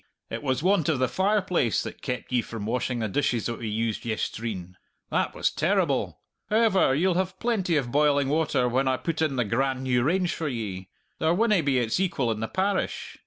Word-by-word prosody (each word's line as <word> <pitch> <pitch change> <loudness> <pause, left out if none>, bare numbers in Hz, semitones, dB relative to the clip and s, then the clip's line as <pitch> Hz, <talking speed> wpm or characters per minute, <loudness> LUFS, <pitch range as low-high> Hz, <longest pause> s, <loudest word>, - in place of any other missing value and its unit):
It - - -4
was 135 0 -1
want 180 -4 +3
of 155 - +2
the 130 0 +2
fireplace 190 - +1
that - - -8
kept 125 0 -4
ye 125 -1 +3
from 110 -2 -6
washing 125 +2 -1
the 110 -2 -1
dishes 120 +1 0
that 115 - -3
we 115 - -4
used 110 0 -2
yestreen. 110 -5 -4 0.4
That - - 0
was - - +1
terrible! - - 0 0.3
However, 210 -10 +3
ye'll 180 +5 +2
have 185 +1 -1
plenty 195 -9 +1
of 125 -4 -2
boiling 145 -1 +3
water 150 -5 +1
when 130 +2 +1
I 130 -1 +2
put 160 +2 -3
in 155 -4 +1
the 125 -2 +1
grand 130 +4 0
new 125 -2 +2
range 175 +6 +1
for 160 - -3
ye; 100 -8 -4 0.3
there 160 +2 +2
winna 210 -2 +3
be 140 -3 +1
its 120 +4 0
equal 140 -11 0
in 110 - -3
the 110 - -2
parish! 195 - -2
135 Hz, 205 wpm, -26 LUFS, 120-175 Hz, 0.4 s, want